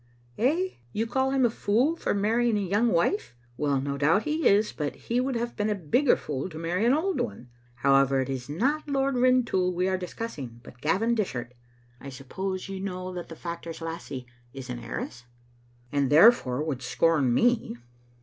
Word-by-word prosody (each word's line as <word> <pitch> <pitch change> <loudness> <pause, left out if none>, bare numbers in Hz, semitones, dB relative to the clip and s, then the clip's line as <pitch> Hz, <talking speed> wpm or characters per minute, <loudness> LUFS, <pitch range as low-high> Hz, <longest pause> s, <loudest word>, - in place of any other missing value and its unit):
"Eh? 320 - +2 0.2
You 220 - 0
call 265 +3 0
him 265 -1 +3
a - - +4
fool 240 +9 +1
for 330 - -1
marrying 225 +2 +2
a - - 0
young 205 +5 +1
wife? 175 - +1 0.2
Well, 140 0 0
no 140 +1 -3
doubt 165 +8 +3
he 310 +1 +1
is, 210 +2 +4
but 150 -2 -3
he 240 +2 -1
would 260 0 -1
have 235 0 -3
been 210 +1 0
a 210 - +1
bigger 200 - +3
fool 140 +3 -4
to 155 - -9
marry 175 +6 -1
an 250 - +5
old 370 +4 0
one. 115 +5 -5 0.3
However, 135 +1 +3
it 130 - -1
is 130 -1 -5
not 275 - 0
Lord 275 0 +1
Rintoul 245 -7 +3
we 180 +1 +1
are 190 -1 0
discussing, 155 - -6
but 125 - -14
Gavin 205 +10 +1
Dishart. 125 - -2 0.5
I 140 - -8
suppose 185 +9 -5
you 195 -1 -5
know 185 -1 -5
that 175 -1 -6
the 165 - -8
factor's 170 0 -6
lassie 165 -6 -6 0.3
is 130 -2 -7
an 120 - -5
heiress?" 120 +1 -6 0.7
"And, 140 -2 +1
therefore, 150 - +5
would 145 -5 -3
scorn 150 -3 +2
me." 235 - +2
185 Hz, 190 wpm, -27 LUFS, -, 0.7 s, an